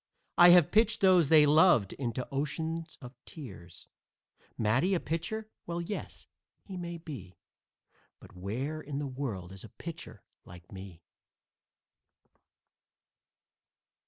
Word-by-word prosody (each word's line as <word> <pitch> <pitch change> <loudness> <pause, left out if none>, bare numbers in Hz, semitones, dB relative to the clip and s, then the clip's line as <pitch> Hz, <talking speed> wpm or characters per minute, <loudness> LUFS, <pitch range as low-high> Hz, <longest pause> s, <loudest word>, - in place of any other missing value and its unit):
I 175 0 +8
have 175 -3 +6
pitched 220 +1 +3
those 180 -6 +5
they 155 -2 +7
loved 150 - +4
into 125 -1 -4
oceans 160 +4 -3
of 125 +1 -9
tears. 95 - -11 0.7
Matty 130 - +2
a - - +1
pitcher? 175 +9 -4 0.2
Well, 170 0 -3
yes, 175 +4 -6 0.4
he 195 - -9
may 175 -1 -5
be, 130 - -10 0.8
But - - -16
where 125 +12 -4
in 140 -1 -6
the 145 - -2
world 125 -10 -5
is 95 -1 -10
a 110 - -11
pitcher 165 - -9 0.2
like 90 -1 -14
me? 95 -4 -11
145 Hz, 120 wpm, -30 LUFS, 105-170 Hz, 0.8 s, I